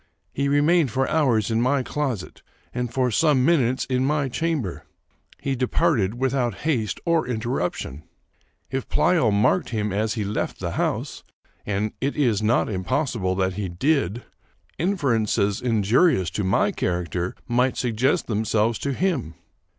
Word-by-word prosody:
He 140 +1 0
remained 145 +1 +3
for 130 +3 0
hours 120 -9 +2
in 115 +1 +1
my 130 +2 +2
closet, 130 -5 -3 0.3
and 125 -1 -2
for 125 0 +1
some 140 +1 +3
minutes 130 -7 +2
in 130 -1 0
my 145 0 +1
chamber. 150 - -2 0.6
He 135 -1 -2
departed 125 - +1
without 130 -3 0
haste 120 -9 0
or 170 -4 +2
interruption. 110 - -3 0.7
If 135 -1 -3
Pleyel 160 -11 +3
marked 100 -2 +2
him 105 -3 -2
as 110 +3 0
he 110 - -1
left 100 +1 -3
the - - -3
house, - - -2 0.4
(and 105 +1 -1
it 140 +2 -1
is 120 -8 +2
not 110 +3 +2
impossible 105 - -1
that 95 0 0
he 100 -1 -3
did,) 120 - 0 0.6
in 195 +4 +1
ferences 110 - +1
injurious 115 - +2
to 100 +4 -2
my 95 +2 +2
character 90 0 -2
might 125 +2 +1
suggest 125 +2 +1
them 110 -1 -1
selves 110 +1 +1
to 140 - -2
him. 160 - -1
120 Hz, 150 wpm, -24 LUFS, 105-140 Hz, 0.7 s, remained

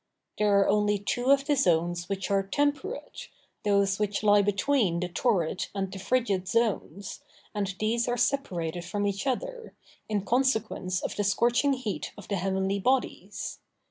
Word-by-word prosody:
There 205 -1 +4
are 195 - +3
only 210 0 +2
two 245 +6 -1
of 275 0 +5
the 295 - +2
zones 175 -6 +1
which 195 0 -3
are 195 0 +3
temperate, 290 - -2 0.4
those 200 -1 +2
which 210 0 -1
lie 205 -1 +6
between 205 -2 +1
the 180 - -1
torrid 180 -2 0
and 195 -1 -2
the 195 - -6
frigid 200 -4 0
zones, 205 - -1 0.3
and 200 -3 -2
these 230 +2 +1
are 245 0 0
separated 175 -12 -1
from 205 +4 -2
each 200 +6 -2
other, 485 - -3 0.3
in 205 -2 -1
consequence 220 -7 0
of - - -3
the 205 - 0
scorching 240 +7 +2
heat 250 -6 -4
of 205 - -11
the 200 - 0
heavenly 190 +2 0
bodies. 255 +5 -1
205 Hz, 160 wpm, -28 LUFS, 195-245 Hz, 0.4 s, lie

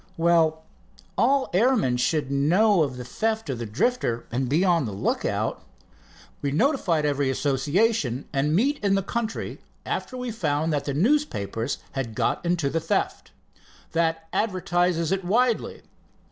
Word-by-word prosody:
"Well, 165 -1 +3 0.5
all 265 +5 +2
airmen 200 - +3
should 140 +2 0
know 175 +8 +3
of 135 -4 -1
the 125 - -7
theft 220 - -2
of 125 - -4
the 115 - -4
Drifter, 120 - 0
and 125 +1 -1
be 165 +7 +2
on 170 -6 +3
the 110 - -4
lookout." 100 - -1 0.8
"We 140 - -1
notified 165 - +1
every 140 -2 +1
association 145 - +1
and 150 +2 +1
meet 275 +6 +1
in 195 -1 +3
the 195 - 0
country 230 +2 -3 0.3
after 255 - -3
we 250 -1 -4
found 160 -6 -1
that 145 - -1
the 140 - -2
newspapers 150 - 0
had 125 -5 -4
got - - 0
onto 175 -4 0
the 165 - 0
theft. - - -2 0.6
That 165 -1 0
advertises 180 -4 0
it 195 0 0
widely. 230 +5 0
165 Hz, 145 wpm, -25 LUFS, 140-215 Hz, 0.8 s, Well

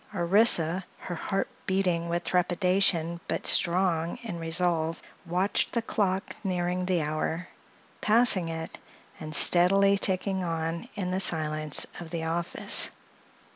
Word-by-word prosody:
Orissa, 180 -1 +3
her 180 - -7
heart 195 +3 -2 0.2
beating 180 -3 0
with 175 +1 -2
trepidation 180 -2 0
but - - -3
strong 170 -2 +1
in 185 -7 -6
resolve, 165 -1 0 0.3
watched 180 +4 -1
the 235 - 0
clock 195 -3 -2
nearing 180 -1 -2
the 180 -4 0
hour, 155 +3 -3 0.5
passing 215 -6 +3
it, 160 0 -7 0.4
and 155 -1 -4
steadily 195 +4 +5
ticking 190 0 +1
on 165 0 -4
in 180 -3 -3
the 185 - -1
silence 155 -4 +2
of 170 -2 -9
the 165 -1 -4
office. 170 +1 +1
175 Hz, 125 wpm, -27 LUFS, 165-190 Hz, 0.5 s, steadily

